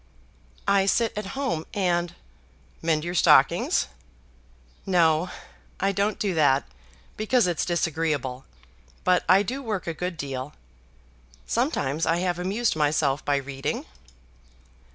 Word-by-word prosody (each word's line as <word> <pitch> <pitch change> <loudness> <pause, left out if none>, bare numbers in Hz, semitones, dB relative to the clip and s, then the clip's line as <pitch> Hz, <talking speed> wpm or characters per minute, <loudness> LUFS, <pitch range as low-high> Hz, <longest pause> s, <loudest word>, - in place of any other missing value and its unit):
"I 195 -1 +3
sit 230 +2 +1
at 210 -1 -4
home, 255 - -1
and 175 -3 0 0.3
" 65 +3 -32
"Mend 160 -2 +1
your 175 +1 -3
stockings?" 175 - +4 1.0
"No; 170 -2 +3 0.5
I 195 +1 +2
don't 200 +2 0
do 200 -3 -1
that, 145 -4 +3 0.5
because 225 +2 +2
it's 175 -2 0
disagreeable; 155 -6 -1 0.6
but 180 -1 +3
I 195 +2 +6
do 260 +7 -4
work 215 -7 -3
a 165 - -2
good 180 +1 -4
deal. 135 -1 -5 0.9
Sometimes 135 - 0
I 165 - +2
have 180 -1 -1
amused 205 +5 0
myself 150 -1 +1
by 145 - +1
reading." 135 0 -3
170 Hz, 125 wpm, -25 LUFS, 150-195 Hz, 1.0 s, I